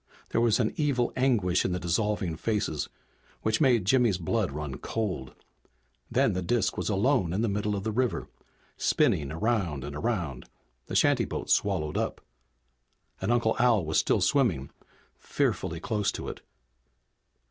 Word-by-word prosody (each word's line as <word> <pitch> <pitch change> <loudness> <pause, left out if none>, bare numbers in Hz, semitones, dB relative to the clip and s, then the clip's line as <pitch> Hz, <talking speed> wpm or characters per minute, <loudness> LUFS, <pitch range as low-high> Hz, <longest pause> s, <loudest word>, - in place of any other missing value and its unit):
There 115 - +2
was 115 -1 +3
an 110 -3 +1
evil 140 -5 +1
anguish 110 -9 +2
in 90 - -1
the 90 - -1
dissolving 90 0 0
faces 100 -6 -2 0.5
which 110 +3 +1
made 120 -8 +4
Jimmy's 120 -3 +3
blood 80 -5 -1
run 70 -2 -5
cold. 95 -12 -3 0.7
Then - - +2
the 90 - -1
disk 95 +2 0
was - - -2
alone 100 - +2
in 105 +5 0
the - - +2
middle 105 0 -1
of 100 - -4
the 110 - -1
river, 125 +2 -1 0.5
spinning 70 -2 +2
around 90 - -1
and 70 +1 -6
around, 85 - -3 0.4
the - - -5
shantyboat - - +1
swallowed 75 -1 +1
up. - - -2 1.0
And 95 +5 0
Uncle 120 -2 +2
Al 120 -7 +4
was 80 0 +2
still - - +2
swimming, 105 - +1 0.5
fearfully 80 - -1
close 105 +2 0
to - - -5
it. - - -8
105 Hz, 150 wpm, -28 LUFS, 85-115 Hz, 1.0 s, made